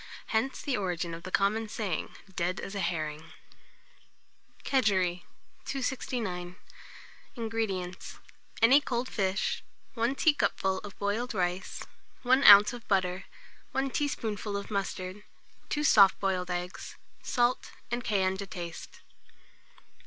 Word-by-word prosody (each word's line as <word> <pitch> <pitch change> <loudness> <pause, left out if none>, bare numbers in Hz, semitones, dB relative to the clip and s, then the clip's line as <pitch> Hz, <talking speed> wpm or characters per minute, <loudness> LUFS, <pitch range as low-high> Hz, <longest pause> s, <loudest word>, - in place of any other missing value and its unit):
Hence 250 +5 0
the 280 -4 0
origin 175 -3 -2
of 165 - -7
the 185 - -7
common 210 +4 +1
saying, 205 -7 -3 0.2
"dead 175 +2 -1
as 195 - -6
a 200 - -3
herring." 160 -3 -3 1.3
KEGEREE. 190 -9 +1 0.4
269. 230 -9 -3 0.8
INGREDIENTS. 220 -6 -3 0.5
Any 265 +6 +7
cold 250 -2 -2
fish, 195 -3 -1 0.3
1 235 +3 0
teacupful 200 -10 +2
of 205 -2 -10
boiled 215 +4 -2
rice, 180 0 -2 0.4
1 260 +2 +4
oz. 205 +1 +9
of 240 -2 -9
butter, 185 -1 0 0.5
1 270 0 0
teaspoonful 220 -8 -2
of 200 - -7
mustard, 195 0 -3 0.5
2 295 - -1
soft 200 -9 +6
boiled 185 -2 -1
eggs, 180 0 -5 0.3
salt 245 0 +1 0.2
and 240 0 -1
cayenne 190 -3 +1
to 200 0 -5
taste. 170 -3 -8
200 Hz, 115 wpm, -29 LUFS, 180-235 Hz, 1.3 s, oz